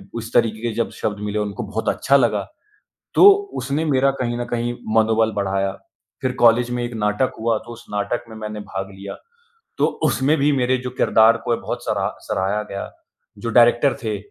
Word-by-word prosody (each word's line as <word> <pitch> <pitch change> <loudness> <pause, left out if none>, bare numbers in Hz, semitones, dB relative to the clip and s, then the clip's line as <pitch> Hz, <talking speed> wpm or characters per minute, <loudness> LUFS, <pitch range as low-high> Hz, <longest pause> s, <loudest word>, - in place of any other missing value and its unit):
उस 115 0 -6
तरीक़े 110 -1 +2
के 120 - -1
जब 115 0 0
शब्द 105 -1 -2
मिले 105 +1 -1
उनको 105 +3 -3
बहुत 110 +2 -2
अच्छा 140 +1 +3
लगा। 120 -4 +1 0.7
तो 405 - +9 0.3
उसने 145 +4 -1
मेरा 135 -2 +3
कहीं 120 -1 -1
न 120 - -2
कहीं 120 0 -1 0.2
मनोबल 110 0 +3
बढ़ाया 95 -1 -1 0.5
फ़िर 130 - 0
कॉलेज 120 +1 +5
में 120 0 -2
एक 120 - -5
नाटक 105 +3 0
हुआ 115 0 +1
तो 120 - -8
उस 115 - -12
नाटक 105 +4 -2
में 110 - -9
मैंने 105 -1 -6
भाग 95 -1 -6
लिया। 100 +1 -8 0.6
तो - - +4 0.2
उसमें 145 +4 +2
भी 145 +2 +3
मेरे 130 -1 +2
जो 125 - -3
किरदार 110 +1 +5
को 120 - +1
बहुत - - -6
सरा - - 0 0.2
सराहा 100 +3 -1
गया। 100 - -5 0.5
जो 115 - -4
डायरेक्टर 120 +3 +5
थे 110 -3 -2
115 Hz, 190 wpm, -21 LUFS, 105-120 Hz, 0.7 s, तो